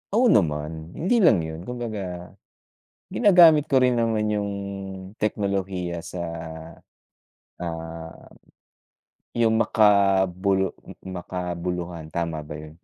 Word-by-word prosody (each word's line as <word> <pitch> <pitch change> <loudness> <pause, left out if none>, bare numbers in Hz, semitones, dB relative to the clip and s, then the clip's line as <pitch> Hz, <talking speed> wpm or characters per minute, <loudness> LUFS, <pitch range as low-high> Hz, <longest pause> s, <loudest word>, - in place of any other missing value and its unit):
Oo 240 -2 +5
naman, 80 -1 0
hindi 215 +9 +2
lang 115 - +5
yun, 80 +3 -7
kumbaga, 100 -8 -5 0.8
ginagamit 175 - +6
ko 135 -4 +3
rin 125 -1 +3
naman 110 -2 +1
yung 105 -1 -1 0.7
teknolohiya 95 -5 -2
sa, 85 0 -6 1.3
ah, 80 -1 -6 1.2
yung 115 -1 +2
makabulu 100 -3 +3 0.2
m - - -10 0.2
makabuluhan. 90 -2 -5
Tama 80 -3 -3
ba - - -7
yun? 75 +1 -12
95 Hz, 100 wpm, -24 LUFS, 85-110 Hz, 1.3 s, ginagamit